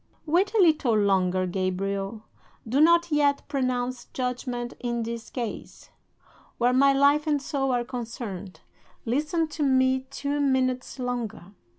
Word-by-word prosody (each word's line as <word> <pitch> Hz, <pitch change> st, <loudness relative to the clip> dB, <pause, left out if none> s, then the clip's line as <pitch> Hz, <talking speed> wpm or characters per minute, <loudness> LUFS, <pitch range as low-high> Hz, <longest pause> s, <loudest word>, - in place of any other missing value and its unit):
"'Wait 355 Hz, +6 st, +2 dB
a -, -, +4 dB
little 310 Hz, -, +4 dB
longer, 185 Hz, -2 st, +2 dB
Gabriel. 195 Hz, +3 st, -2 dB, 0.4 s
Do 265 Hz, +6 st, +2 dB
not 340 Hz, +1 st, +5 dB
yet 290 Hz, -1 st, +2 dB
pronounce 255 Hz, -3 st, -2 dB
judgment 250 Hz, -1 st, -4 dB
in 235 Hz, -1 st, -2 dB
this 230 Hz, 0 st, -6 dB
case, 235 Hz, -4 st, -6 dB, 0.7 s
where 245 Hz, +1 st, +2 dB
my 275 Hz, +2 st, +5 dB
life 285 Hz, +3 st, +3 dB
and 295 Hz, -2 st, +2 dB
soul 270 Hz, -1 st, -2 dB
are 245 Hz, -1 st, +1 dB
concerned. 225 Hz, -6 st, -6 dB, 0.4 s
Listen 300 Hz, +7 st, 0 dB
to 305 Hz, -, -6 dB
me 260 Hz, -1 st, +2 dB
two 285 Hz, +1 st, -3 dB
minutes 260 Hz, -2 st, 0 dB
longer. 240 Hz, -6 st, -4 dB
255 Hz, 130 wpm, -26 LUFS, 230-285 Hz, 0.7 s, not